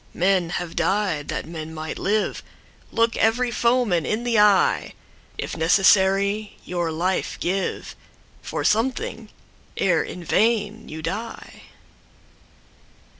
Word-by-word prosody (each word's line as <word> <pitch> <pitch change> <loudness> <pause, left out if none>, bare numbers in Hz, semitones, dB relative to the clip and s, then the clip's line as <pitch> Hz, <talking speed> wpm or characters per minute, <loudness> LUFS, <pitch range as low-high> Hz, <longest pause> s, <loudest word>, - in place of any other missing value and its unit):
Men 180 -1 +2
have 175 -2 -6
died 170 -4 0
that - - -3
men 160 -1 -7
might 155 0 -5
live:Look 215 +2 -2
every 240 +2 +2
foeman 235 -8 +2
in 215 +7 -2
the 235 -3 +2
eye! 210 -2 +3 0.4
If - - -4
necessary, 195 +4 +3
your 175 -2 -2
life 180 +4 -1
giveFor 190 +2 -5
something, 265 - 0 0.5
ere - - +2
in 180 - -7
vain 220 +2 +1
you 160 +1 -7
die. 215 +8 -6
195 Hz, 105 wpm, -23 LUFS, 170-225 Hz, 0.5 s, eye